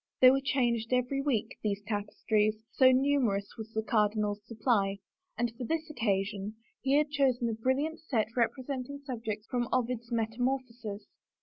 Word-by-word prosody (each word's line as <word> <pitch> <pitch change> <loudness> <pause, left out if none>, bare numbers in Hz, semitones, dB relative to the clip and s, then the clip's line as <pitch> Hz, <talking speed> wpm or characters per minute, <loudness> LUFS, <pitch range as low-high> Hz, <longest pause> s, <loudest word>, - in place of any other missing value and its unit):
They 255 0 +9
were 270 +1 +2
changed 240 -4 +1
every 250 +2 +1
week, 270 -7 -1
these 205 -1 -1
tapestries, 210 +1 0 0.2
so 260 -1 +6
numerous 255 -7 +2
was 220 0 -8
the 220 0 -1
cardinal's 210 -1 +1
supply, 215 -4 +1 0.4
and 240 -1 0
for 250 - -6
this 320 +4 -2
occasion 205 -4 -1 0.3
he 270 0 +1
had 300 -1 +2
chosen 260 -5 +2
a - - -1
brilliant 270 +8 0
set 235 -8 -1
rep 235 -2 +4
resenting 265 +1 -4
subjects 220 -5 -4
from 245 -1 -1
Ovid's 245 -1 -1
Metamorphoses. 230 -1 -2
235 Hz, 150 wpm, -31 LUFS, 215-260 Hz, 0.4 s, They